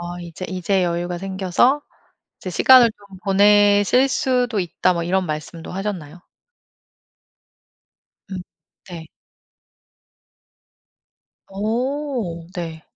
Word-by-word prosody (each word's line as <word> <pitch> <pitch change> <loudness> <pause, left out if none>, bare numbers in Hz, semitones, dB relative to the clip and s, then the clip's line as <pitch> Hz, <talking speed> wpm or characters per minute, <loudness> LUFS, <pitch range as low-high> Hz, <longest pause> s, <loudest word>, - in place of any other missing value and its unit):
어 175 0 -6
"이제 170 +1 -8
이제 185 0 0
여유가 175 0 -2
생겨서 195 +9 +1 0.6
이제 185 - -6
시간을 245 +6 +6
좀 200 -2 -16
보내실 205 +5 +4
수도 250 -4 0
있다." 180 +1 0
뭐 170 - -2
이런 185 +1 0
말씀도 155 +2 -6
하셨나요? 180 -5 -5 2.1
음 190 - -5 0.5
네. 165 -3 -8 2.4
어 225 - -3
네. 165 -3 -6
190 Hz, 175 characters per minute, -21 LUFS, 175-210 Hz, 2.4 s, 시간을